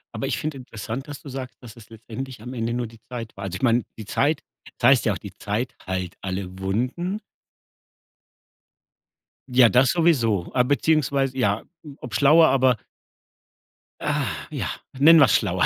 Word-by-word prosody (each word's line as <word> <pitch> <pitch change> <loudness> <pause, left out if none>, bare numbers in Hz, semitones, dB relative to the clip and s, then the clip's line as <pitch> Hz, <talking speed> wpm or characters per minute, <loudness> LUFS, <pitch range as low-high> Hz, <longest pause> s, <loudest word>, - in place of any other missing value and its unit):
Aber - - -2
ich - - -1
finde 155 -2 -4
interessant, 125 +1 -6
dass 145 -1 -8
du 145 - -10
sagst, 130 -1 -7
dass 115 -3 -12
es 115 -3 -15
letztendlich 115 +2 -8
am 125 +3 -7
Ende 115 -1 -2
nur 120 0 -1
die 115 0 -16
Zeit 115 -3 -7
war. 100 - -6
Also, 95 -2 -4
ich - - -7
meine, 120 -1 +3
die 110 - -8
Zeit 145 +7 +1 0.4
es - - -15
heißt - - +5
ja - - +2
auch: - - -4
Die - - -10
Zeit 115 +6 -3
heilt 95 -1 -3
alle 95 -1 -5
Wunden. 125 - -2 2.3
Ja, 125 -1 +6
das 125 +2 +4
sowieso. 120 - +2
Ah, 125 - +4
beziehungsweise 140 -1 +1
ja, 105 -4 +1 0.3
ob - - -9
schlauer, 155 +3 +6
aber 130 -2 +3 1.2
Ach 135 - -2
ja, - - -3 0.3
nennen 155 +5 +7
wir's 135 -8 +6
schlauer. - - +1
125 Hz, 170 wpm, -24 LUFS, 110-140 Hz, 2.3 s, nennen